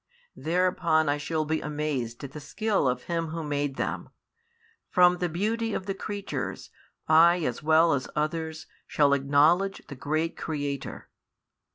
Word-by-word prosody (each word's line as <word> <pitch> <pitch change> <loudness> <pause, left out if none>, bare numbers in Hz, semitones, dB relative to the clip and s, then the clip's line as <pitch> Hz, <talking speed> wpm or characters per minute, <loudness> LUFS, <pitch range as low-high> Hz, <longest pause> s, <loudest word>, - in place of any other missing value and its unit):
Thereupon 170 -2 +1
I 145 - +1
shall 155 +1 -1
be 155 +1 -1
amazed 145 -5 -3
at 140 - -6
the 150 - -8
skill 205 +2 0
of 125 0 -1
Him 165 -1 -2
Who 165 +1 -5
made 145 -2 -2
them; - - -3 0.8
from 180 0 +5
the 180 - 0
beauty 220 +6 -1
of 185 - -4
the 195 - -2
creatures 200 +1 -5 0.4
I 170 +2 +6
as 120 - -2
well 160 +1 +4
as 130 -2 -2
others 160 +1 -2 0.2
shall 145 -2 +3
acknowledge 150 +8 +3
the 140 - -7
Great 155 +5 -1
Creator. 145 -3 -4
160 Hz, 150 wpm, -27 LUFS, 145-175 Hz, 0.8 s, I